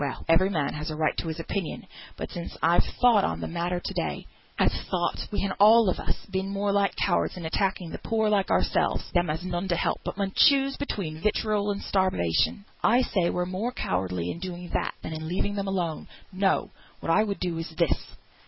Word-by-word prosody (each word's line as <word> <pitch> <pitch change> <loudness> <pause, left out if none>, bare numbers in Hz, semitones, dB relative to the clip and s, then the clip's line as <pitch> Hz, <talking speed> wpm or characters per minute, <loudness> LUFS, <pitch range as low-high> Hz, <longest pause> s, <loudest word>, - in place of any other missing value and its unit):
Well! 140 -2 -3
every 170 +4 +4
man 155 -7 -1
has 150 +2 -4
a 155 - -4
right 155 0 +1
to - - -2
his 160 0 -4
opinion; 175 +1 -4 0.3
but - - -5
since 170 -1 -6
I've 170 +2 +5 0.2
thought 235 -5 +6
on - - -1
th' - - -4
matter 175 +1 -2
to - - -5
day, - - -3 0.3
I've - - +3 0.2
thought - - -1
we 205 - -1
han 195 - -1
all 220 +2 +7
on - - -4
us - - -4
been 190 -1 -3
more 200 +1 0
like 200 0 +2
cowards 185 -1 +1
in 175 - -6
attacking 180 0 -1
the - - -6
poor 220 -1 0
like 205 -2 +2
ourselves; - - +1
them 175 -3 +2
as 155 +2 -2
has 185 - -5
none 175 +2 -2
to 175 - +1
help, - - 0
but - - -5
mun 195 -1 -1
choose 275 -1 +5
between 170 - -4
vitriol 210 0 +1
and 200 0 -2
starvation. 185 - +1 0.2
I 245 +3 +5
say 185 -8 +1
we're 180 - -1
more 190 +7 -2
cowardly 90 - -2
in 170 - -7
doing 175 -1 -6
that - - -1
than - - -5
in 160 0 -5
leaving 190 +4 -1
them 200 -1 -2
alone. 175 -5 -2 0.3
No! 190 +1 +1 0.3
what - - -1
I 200 - +5
would 200 -2 -3
do 175 -3 -2
is 165 - -4
this. 170 -2 0
185 Hz, 220 wpm, -27 LUFS, 165-200 Hz, 0.3 s, all